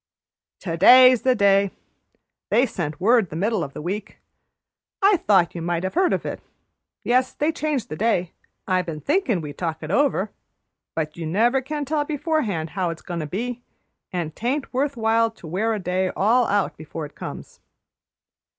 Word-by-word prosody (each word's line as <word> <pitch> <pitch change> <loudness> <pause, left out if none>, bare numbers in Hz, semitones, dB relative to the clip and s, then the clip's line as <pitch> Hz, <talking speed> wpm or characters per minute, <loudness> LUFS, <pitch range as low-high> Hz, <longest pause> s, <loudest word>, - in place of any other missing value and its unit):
"To 165 -3 -3
day's 255 +6 +8
the 255 -1 +3
day. 200 -2 +4 0.8
They 250 - +4
sent 175 - -4
word 220 0 +3
the - - -8
middle 210 +6 0
o' - - -3
the 140 +2 -9
week. 200 +4 -5 0.8
I 395 -1 +5
thought 195 - +3
you 170 - -5
might 170 +1 -1
have 190 - -2
heard 370 +1 +2
of - - -1
it. - - -5 0.6
Yes, 255 +1 +2
they 300 +2 0
changed 305 -6 -2
the - - -4
day. 180 -3 0 0.4
I 185 -1 +2
been 165 -4 -6
thinkin' 285 - +1
we'd 150 -2 -8
talk 165 -2 -3
it 155 - -5
over, 215 -4 +1 0.6
but 155 -1 -3
you 165 -2 -4
never 235 +10 +2
can 295 +2 -4
tell 295 +1 0
beforehand 290 - -2
how 180 0 -1
it's 165 -1 -7
goin' 175 -2 -5
to 155 - -4
be, 240 +8 -4 0.5
and 165 -4 -3
'taint 265 +5 -2
worth 275 +1 -1
while 225 0 +2
to 225 -6 -16
wear 195 +8 -1
a 215 - -1
day 185 0 -1
all 230 +5 +3
out 205 -1 0
before 155 0 -7
it 145 - -12
comes." - - -9
205 Hz, 180 wpm, -23 LUFS, 170-255 Hz, 0.8 s, day's